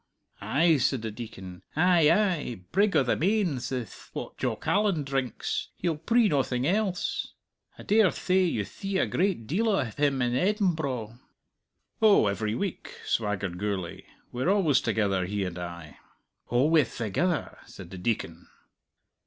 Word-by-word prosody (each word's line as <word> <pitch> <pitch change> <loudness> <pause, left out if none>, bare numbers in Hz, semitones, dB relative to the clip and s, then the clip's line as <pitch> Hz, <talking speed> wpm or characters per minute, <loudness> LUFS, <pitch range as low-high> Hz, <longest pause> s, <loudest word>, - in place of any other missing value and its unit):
'" - - -38
"Ay," 160 +2 +3
said 130 -2 0
the 110 - -3
Deacon. 95 -5 -9
"Ay, 170 -1 +4
ay! 170 - +1 0.2
'Brig 205 +1 +2
o' - - +5
the 120 - +1
Mains' 180 - 0
ith 125 -6 -6
what - - -6
Jock - - -3
Allan 200 -7 +2
drinks. 135 -3 -2
He'll 170 -3 -1
pree 225 +9 +2
noathing 130 -6 0
else. 190 +1 -1 0.4
I - - -10
dare 210 -2 +4
thay 185 +3 +1
you 110 - -1
thee 195 - -4
a - - +2
great 180 - 0
deal 200 - 0
of 135 - 0
him 145 -2 +2
in 120 0 0
Embro." 155 - 0 0.8
"Oh, 215 - +6
every 105 +2 -1
week," 195 +6 -4
swaggered 100 -5 -1
Gourlay. 100 -4 -3 0.3
"We're 125 +8 -1
always 180 -10 +3
together, 100 -4 0
he 100 0 -2
and 90 -1 -5
I." 85 -3 -8 0.5
"Alwayth 145 +2 +2
thegither!" 145 - -1
said - - -11
the 95 - -7
Deacon. 90 -4 -3
135 Hz, 150 wpm, -27 LUFS, -, 0.8 s, Oh